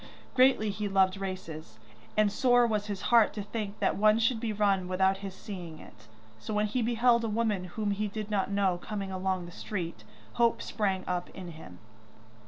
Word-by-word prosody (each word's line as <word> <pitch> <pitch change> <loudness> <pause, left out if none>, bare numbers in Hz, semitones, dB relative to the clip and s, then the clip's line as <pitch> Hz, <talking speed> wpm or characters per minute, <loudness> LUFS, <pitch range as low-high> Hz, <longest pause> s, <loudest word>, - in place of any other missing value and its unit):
Greatly 255 -5 +4
he 205 0 -3
loved 190 0 +3
races, 165 - -6 0.4
and 210 -1 +4
sore 245 +3 +4
was 215 -2 -1
his 200 -2 -4
heart 230 -3 +6
to 205 - -4
think 210 0 -5
that - - +1
one 215 +1 +4
should 230 +1 +2
be 225 -1 -2
run 200 -3 +1
without 190 +1 +2
his 195 -1 -7
seeing 180 -5 -8
it, 110 -7 -15 0.3
so 215 - -5
when 210 0 +2
he 215 +4 -1
beheld 235 +1 +3
a 225 - -1
woman 210 -4 0
whom 205 +3 -2
he 210 +1 -1
did 215 +1 -6
not 195 -2 0
know 195 -3 +1
coming 200 0 -5
along 185 -1 -1
the 175 - -10
street, 170 - -5 0.4
hope 235 -1 +4
sprang 195 -4 -1
up 180 -1 -2
in 185 -2 -7
him. 155 - -12
200 Hz, 190 wpm, -29 LUFS, 185-215 Hz, 0.4 s, heart